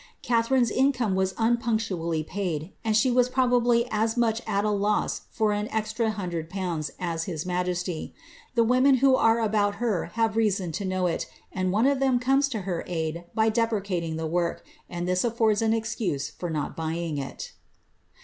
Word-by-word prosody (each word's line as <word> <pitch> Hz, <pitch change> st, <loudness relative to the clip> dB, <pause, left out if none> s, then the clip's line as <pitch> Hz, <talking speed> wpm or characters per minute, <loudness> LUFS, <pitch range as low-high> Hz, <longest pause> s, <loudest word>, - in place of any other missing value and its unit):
Catharine's 235 Hz, 0 st, +2 dB
income 255 Hz, -6 st, +2 dB
was 190 Hz, 0 st, 0 dB
un 235 Hz, +1 st, +3 dB
punctually 190 Hz, -9 st, -1 dB
paid, 175 Hz, -1 st, -4 dB
and 220 Hz, -1 st, +2 dB
she 255 Hz, +2 st, +3 dB
wv 250 Hz, 0 st, +3 dB
probably 245 Hz, -2 st, +3 dB
fs 220 Hz, +2 st, 0 dB
much 230 Hz, -1 st, +1 dB
at 200 Hz, +1 st, 0 dB
a 210 Hz, -, +2 dB
loss 205 Hz, +1 st, 0 dB
for 215 Hz, -2 st, +1 dB
an 210 Hz, +1 st, -2 dB
extra 220 Hz, +1 st, -1 dB
hundred 175 Hz, -6 st, -4 dB
pounds 175 Hz, -5 st, -3 dB
as 165 Hz, -2 st, -2 dB
hit 165 Hz, -5 st, -4 dB
majestj; 180 Hz, -1 st, -2 dB, 0.4 s
the 230 Hz, -, +5 dB
women 255 Hz, +4 st, +4 dB
who 265 Hz, +1 st, +4 dB
are 225 Hz, -2 st, +3 dB
about 205 Hz, -2 st, +1 dB
her 215 Hz, -5 st, -1 dB
have 225 Hz, -1 st, +1 dB
reason 200 Hz, -6 st, +1 dB
to 195 Hz, +5 st, -4 dB
know 185 Hz, -1 st, 0 dB
it, 175 Hz, -, -1 dB, 0.3 s
and 185 Hz, -1 st, 0 dB
one 215 Hz, +5 st, +2 dB
of 275 Hz, -1 st, +3 dB
ihea 265 Hz, -2 st, +2 dB
comes 270 Hz, +2 st, +2 dB
to 225 Hz, -6 st, -3 dB
her 180 Hz, -3 st, -3 dB
aid 165 Hz, 0 st, -3 dB
by 220 Hz, 0 st, +3 dB
depreciating 200 Hz, -7 st, -1 dB
the 160 Hz, 0 st, -3 dB
work, 170 Hz, +1 st, -1 dB, 0.2 s
and 175 Hz, 0 st, -4 dB
this 180 Hz, 0 st, +1 dB
aflbrds 225 Hz, -3 st, +2 dB
an 220 Hz, -1 st, +2 dB
excaN 225 Hz, -10 st, -2 dB
for 175 Hz, -, -4 dB
not 155 Hz, -3 st, -3 dB
buying 165 Hz, -1 st, -3 dB
it. 135 Hz, -, -7 dB
210 Hz, 180 wpm, -26 LUFS, 175-230 Hz, 0.4 s, the